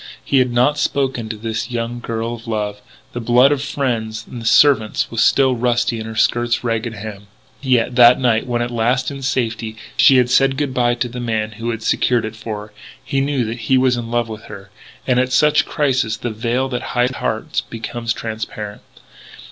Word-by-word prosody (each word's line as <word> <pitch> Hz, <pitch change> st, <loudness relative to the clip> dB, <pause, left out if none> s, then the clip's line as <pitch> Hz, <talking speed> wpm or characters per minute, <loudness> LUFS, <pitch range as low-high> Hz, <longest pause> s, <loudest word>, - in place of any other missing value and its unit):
He 140 Hz, -, +3 dB
had 125 Hz, -1 st, +2 dB
not 125 Hz, +5 st, +2 dB
spoken 135 Hz, -5 st, -1 dB
to 110 Hz, -, -5 dB
this 110 Hz, +2 st, -4 dB
young 120 Hz, 0 st, -3 dB
girl 115 Hz, 0 st, -3 dB
of 115 Hz, 0 st, -10 dB
love. 105 Hz, -2 st, -3 dB, 0.3 s
The 120 Hz, -, -4 dB
blood 125 Hz, +4 st, +4 dB
of 145 Hz, -2 st, 0 dB
friends 115 Hz, -6 st, -2 dB
and 115 Hz, -2 st, -6 dB
servants 115 Hz, -5 st, +3 dB
was 115 Hz, -, 0 dB
still 130 Hz, -2 st, +3 dB
rusty 120 Hz, -1 st, 0 dB
on 110 Hz, -, -6 dB
her 110 Hz, -, -7 dB
skirt's 120 Hz, +1 st, +1 dB
ragged 115 Hz, 0 st, -2 dB
hem. 100 Hz, -1 st, -8 dB, 0.3 s
Yet, 125 Hz, -3 st, +1 dB
that 120 Hz, 0 st, +7 dB
night, 120 Hz, -3 st, +1 dB
when 120 Hz, -1 st, 0 dB
at 120 Hz, -, -4 dB
last 125 Hz, +3 st, 0 dB
in 140 Hz, -1 st, -7 dB
safety 115 Hz, -4 st, -2 dB, 0.2 s
she 135 Hz, -, +6 dB
had 125 Hz, -1 st, +3 dB
said 135 Hz, +1 st, +3 dB
good 145 Hz, -2 st, -1 dB
bye 120 Hz, -1 st, +2 dB
to 120 Hz, +1 st, -2 dB
the 125 Hz, +1 st, -7 dB
man 110 Hz, -3 st, -2 dB
who 115 Hz, +2 st, -5 dB
had 115 Hz, -1 st, -4 dB
secured 120 Hz, 0 st, +1 dB
it 110 Hz, 0 st, -6 dB
for 110 Hz, -1 st, -6 dB
her, 105 Hz, -, -20 dB, 0.3 s
he 135 Hz, 0 st, 0 dB
knew 140 Hz, -3 st, 0 dB
that 115 Hz, +2 st, -5 dB
he 130 Hz, -, +5 dB
was 130 Hz, -1 st, +3 dB
in 120 Hz, -1 st, -5 dB
love 120 Hz, -1 st, 0 dB
with 110 Hz, -1 st, -8 dB
her. 100 Hz, -1 st, -11 dB, 0.3 s
And, 125 Hz, -1 st, +2 dB
at 130 Hz, 0 st, 0 dB
such 150 Hz, +2 st, +3 dB
crises, 130 Hz, -7 st, 0 dB
the 120 Hz, +2 st, -4 dB
veil 120 Hz, +4 st, -1 dB
that 125 Hz, -2 st, -3 dB, 0.2 s
hides 125 Hz, +1 st, +1 dB
hearts 110 Hz, -, -2 dB
becomes 115 Hz, +1 st, -5 dB
transparent. 110 Hz, -2 st, -5 dB
120 Hz, 205 wpm, -19 LUFS, 110-130 Hz, 0.3 s, that